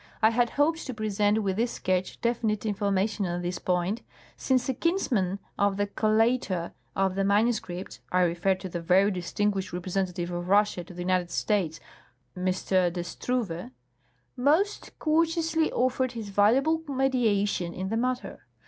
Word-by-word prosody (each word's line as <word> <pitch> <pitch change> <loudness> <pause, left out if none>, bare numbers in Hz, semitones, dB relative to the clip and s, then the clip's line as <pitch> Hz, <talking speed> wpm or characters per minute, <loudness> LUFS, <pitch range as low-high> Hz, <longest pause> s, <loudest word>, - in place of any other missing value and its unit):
I 220 0 +5
had 240 +1 +2
hoped 320 +2 +2
to 255 - -5
present 210 -1 +1
with 190 -1 -1
this 235 +2 0
sketch 185 0 -1
definite 225 -3 0
information 200 -1 0
on 175 0 -3
this 175 0 -3
point, 180 +5 0 0.3
since 255 -2 +1
a 265 - +1
kinsman 240 - 0 0.2
of 200 -1 +2
the 205 - +1
collator 215 -3 +1 0.2
of 190 -1 +1
the 195 +1 0
manuscripts 200 - 0
(I 185 - +3
refer 175 +2 +2
to 185 0 -7
the 175 -1 -5
very 190 +4 +4
distinguished 195 +1 -1
representative 180 0 -2
of 175 +1 -4
Russia 205 -2 +3
to 180 - -12
the 175 - -4
United 180 -1 +1
States, 180 -7 0 0.6
M. 180 0 -4
de 185 -1 +1
Struve) 195 0 -3 0.7
most 310 +11 +1
courteously 325 0 +1
offered 255 0 0
his 225 -3 -6
valuable 260 +11 +3
mediation 225 -10 +1
in 190 +2 -4
the 225 - 0
matter. 250 +2 -3
205 Hz, 150 wpm, -27 LUFS, 185-245 Hz, 0.7 s, I